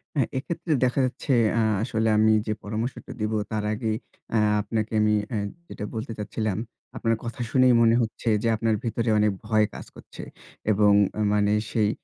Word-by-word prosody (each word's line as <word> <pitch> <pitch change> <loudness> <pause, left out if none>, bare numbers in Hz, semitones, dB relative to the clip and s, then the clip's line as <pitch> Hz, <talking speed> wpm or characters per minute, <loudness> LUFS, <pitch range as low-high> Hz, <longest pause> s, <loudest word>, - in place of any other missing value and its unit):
অ্যা 140 - +3
এক্ষেত্রে 165 +4 -2
দেখা 125 +2 0
যাচ্ছে 130 +2 -2 0.2
অ্যা 115 0 +2 0.2
আসলে 110 -2 0
আমি 110 0 +5
যে 110 - +1
পরামর্শটা 110 +4 -4
দিবো, 110 +1 0
তার 110 -1 -1
আগে 110 0 -2 0.4
অ্যা 110 - +2 0.2
আপনাকে 110 +1 -3
আমি 105 0 +3 0.2
অ্যা 115 -5 -2 0.3
যেটা 105 - -6
বলতে 110 +1 -4
চাচ্ছিলাম, 105 -1 -2 0.4
আপনার 115 -1 +1
কথা 120 +2 -6
শুনেই 130 -1 +5
মনে 115 0 +5
হচ্ছে 115 +1 -2
যে - - +1
আপনার 110 0 +1
ভেতরে 115 0 -1
অনেক 105 0 +3 0.2
ভয় 110 -1 +3
কাজ - - -8
করছে, - - -11 0.5
এবং 105 0 +4 0.3
আ - - +1
মানে 105 0 +2 0.2
সেই 105 -2 +2
110 Hz, 175 wpm, -25 LUFS, 105-120 Hz, 0.5 s, আমি